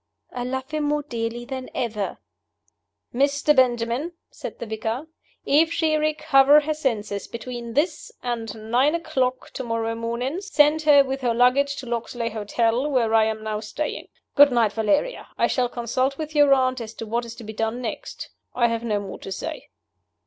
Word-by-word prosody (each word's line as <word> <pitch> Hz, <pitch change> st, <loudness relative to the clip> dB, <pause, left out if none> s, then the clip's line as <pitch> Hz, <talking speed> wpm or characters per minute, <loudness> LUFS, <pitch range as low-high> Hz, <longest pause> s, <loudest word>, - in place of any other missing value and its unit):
"I 245 Hz, -, -3 dB
love 260 Hz, +2 st, -4 dB
him 305 Hz, -1 st, -1 dB
more 295 Hz, 0 st, 0 dB
dearly 235 Hz, -2 st, -4 dB
than 260 Hz, 0 st, -6 dB
ever." 215 Hz, -4 st, -2 dB, 1.0 s
"Mr. 285 Hz, +3 st, +2 dB
Benjamin," 250 Hz, +5 st, +1 dB, 0.2 s
said -, -, -8 dB
the -, -, -6 dB
vicar, 220 Hz, +5 st, -3 dB, 0.4 s
"if 320 Hz, +4 st, +4 dB
she 315 Hz, -2 st, +1 dB
recover 300 Hz, -2 st, +5 dB
her 310 Hz, +1 st, -1 dB
senses 220 Hz, -9 st, -2 dB
between 235 Hz, 0 st, -7 dB
this 300 Hz, +2 st, 0 dB
and 225 Hz, -2 st, -4 dB
nine 270 Hz, +6 st, +4 dB
o'clock 260 Hz, -6 st, -1 dB
to 260 Hz, -, -5 dB
morrow 230 Hz, -1 st, -1 dB
morning, 235 Hz, +8 st, -3 dB
send 310 Hz, -5 st, +3 dB
her 295 Hz, -2 st, +6 dB
with 270 Hz, 0 st, -4 dB
her 240 Hz, -2 st, +1 dB
luggage 270 Hz, +4 st, +3 dB
to 265 Hz, -, -7 dB
Loxley's 235 Hz, -1 st, -3 dB
Hotel, 230 Hz, +5 st, 0 dB
where 240 Hz, -5 st, +1 dB
I 220 Hz, -1 st, +5 dB
am 220 Hz, 0 st, -3 dB
now 215 Hz, -1 st, -2 dB
staying. 285 Hz, +8 st, -4 dB, 0.3 s
Good 285 Hz, -1 st, +8 dB
night, 230 Hz, -4 st, +2 dB
Valeria. 220 Hz, -, 0 dB
I -, -, +3 dB
shall 250 Hz, -2 st, +1 dB
consult 255 Hz, +3 st, -1 dB
with 310 Hz, -1 st, -5 dB
your 290 Hz, -2 st, +5 dB
aunt 255 Hz, -2 st, +3 dB
as 225 Hz, -1 st, -8 dB
to 225 Hz, -, -6 dB
what 235 Hz, +2 st, -1 dB
is 230 Hz, -1 st, -8 dB
to 235 Hz, -, -10 dB
be 220 Hz, 0 st, -7 dB
done 225 Hz, +2 st, -2 dB
next. 240 Hz, -3 st, -6 dB, 0.3 s
I 240 Hz, -1 st, +3 dB
have 230 Hz, 0 st, -2 dB
no 215 Hz, -3 st, 0 dB
more 195 Hz, -2 st, -7 dB
to 195 Hz, -, -8 dB
say." 190 Hz, -, -5 dB
245 Hz, 180 wpm, -24 LUFS, 230-285 Hz, 1.0 s, Good